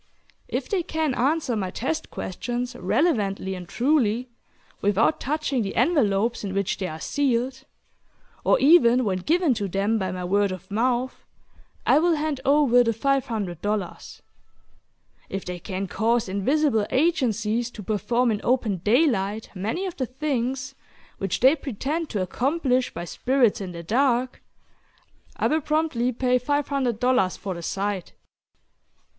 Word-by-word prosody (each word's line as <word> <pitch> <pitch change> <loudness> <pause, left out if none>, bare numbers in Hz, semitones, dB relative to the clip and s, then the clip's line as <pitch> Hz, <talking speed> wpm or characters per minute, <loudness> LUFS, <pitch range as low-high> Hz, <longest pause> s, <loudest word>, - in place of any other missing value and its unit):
If - - -3
they 395 -4 0
can 315 -4 -1
answer 275 0 +1
my 190 -4 -2
test 270 +11 -3
questions 245 +6 -4
relevantly 200 - 0
and 180 -2 -8
truly, 250 -3 +1 0.5
without 205 +9 +2
touching 285 -2 -1
the 195 -2 -3
envelopes 230 - +2
in 195 -1 -4
which 200 0 -1
they 190 - -2
are 155 -1 -7
sealed 265 - -1 0.8
or - - +4
even 255 -5 +5
when 190 -3 0
given 325 - +2
to 210 -3 -2
them 200 +4 0
by 190 -2 -2
my 180 0 -5
word 200 +2 +1
of 185 +1 -8
mouth, 245 +4 0 0.6
I - - +5
will 340 +1 +3
hand 300 -3 -2
over 275 -4 +5
the 230 -1 +1
$500. 215 - -2 1.1
If 195 - -4
they 180 -1 -5
can 190 +1 -4
cause 230 +3 0
invisible 220 +3 +1
agencies 240 - +1
to 215 -3 -10
perform 235 +4 +1
in 210 - -2
open 235 -6 +1
daylight 215 - +1
many 220 - -2
of 370 - -5
the 260 - -2
things 265 -1 -2 0.5
which 195 -2 -2
they 265 +5 +6
pretend 295 +4 -3
to 200 -4 -1
accomplish 255 - 0
by 170 +1 -6
spirits 245 +2 +1
in 185 -2 -5
the 170 -1 -8
dark, 250 +5 +1 1.0
I - - -1
will 315 +1 +2
promptly 300 -5 0
pay 250 +1 +1
$500 255 -6 +1
for 195 - -4
the 170 - -7
sight. 195 +1 -3
240 Hz, 140 wpm, -24 LUFS, 200-275 Hz, 1.1 s, they